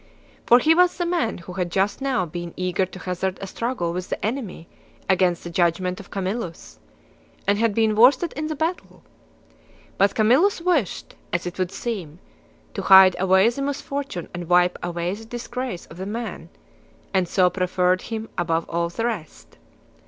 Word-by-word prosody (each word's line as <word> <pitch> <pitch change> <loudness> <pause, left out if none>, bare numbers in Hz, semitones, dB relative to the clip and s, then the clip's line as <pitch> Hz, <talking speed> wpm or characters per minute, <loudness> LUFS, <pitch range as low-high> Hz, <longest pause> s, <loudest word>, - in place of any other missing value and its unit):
For 240 - +8
he 310 +6 +4
was 360 +1 +3
the 350 - -1
man 340 -10 0
who 180 +1 -10
had' 180 -1 -2
just 195 +7 0
now 265 -8 0
been 175 +1 -7
eager 185 +1 0
to 185 - -11
hazard 185 +1 -3
a - - -5
struggle 195 -4 -3
with 180 +1 -5
the - - -3
enemy 215 -8 -4 0.4
against 180 -2 +2
the 170 - -7
judg 170 0 +2
ment 185 0 -3
of - - -12
Camillus, 195 -2 -5 0.7
and 205 +1 +2
had 225 -2 +1
been 220 -1 +2
worsted 260 +9 +5
in 310 0 -3
the 310 - -3
battle. 325 +4 -4 1.0
But 200 +1 +3
Camillus 260 - +4
wished; 335 - -1 0.2
as 175 0 -1
it 175 +1 -6
would 185 -1 -1
seem, 195 -8 -5 0.6
to - - -3
hide 190 -1 +8
away 190 +2 +4
the 240 +4 -5
misfortune 280 -7 -4
and 175 -1 -6
wipe 180 0 +3
away 175 +1 -2
the 215 +2 -8
disgrace 240 -2 -5
of 165 - -14
the 190 +1 -5
man, 230 +2 -5 0.6
and 185 -2 +2
so 180 0 +3
preferred 180 0 +1
him 225 -1 -5
above 165 -1 0
all 170 0 0
the 225 +7 -3
rest. 195 - -6
190 Hz, 175 wpm, -23 LUFS, 180-240 Hz, 1.0 s, For